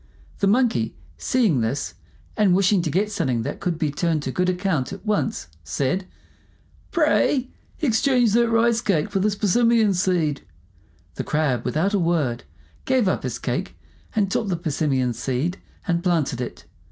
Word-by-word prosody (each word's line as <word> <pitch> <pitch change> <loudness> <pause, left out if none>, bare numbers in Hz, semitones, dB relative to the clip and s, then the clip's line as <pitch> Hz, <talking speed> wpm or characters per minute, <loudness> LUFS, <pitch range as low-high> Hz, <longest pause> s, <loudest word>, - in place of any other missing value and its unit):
The 200 - +2
Monkey, 205 - +2 0.2
seeing 215 - +2
this, 115 +6 -2 0.4
and 200 -4 +4
wishing 195 0 +3
to 165 - -2
get 200 +7 0
something 130 - -1
that - - -4
could 175 -3 -2
be 155 -3 0
turned 160 0 0
to 130 - -3
good 180 +6 +1
account 180 -7 -1
at 195 - -9
once, 155 - -1 0.2
said, 145 - -1 0.8
"Pray, 295 -5 +2 0.3
exchange 245 -3 +3
that 235 0 +3
rice 230 0 +3
cake 170 -8 0
for 195 - 0
this 205 +1 +1
persimmon 220 +1 +3
seed." 175 -6 0 0.7
The - - -4
Crab, 145 -6 0
without 190 +7 0
a 200 - +3
word, 160 -9 0 0.4
gave 260 -5 +2
up 185 - +1
his - - -3
cake, - - -3 0.4
and 200 -3 +1
took 220 - 0
the 180 -3 -1
persimmon 140 -6 0
seed 135 - -2 0.3
and 170 -1 0
planted 160 -9 0
it. 125 - -6
180 Hz, 160 wpm, -23 LUFS, 150-215 Hz, 0.8 s, and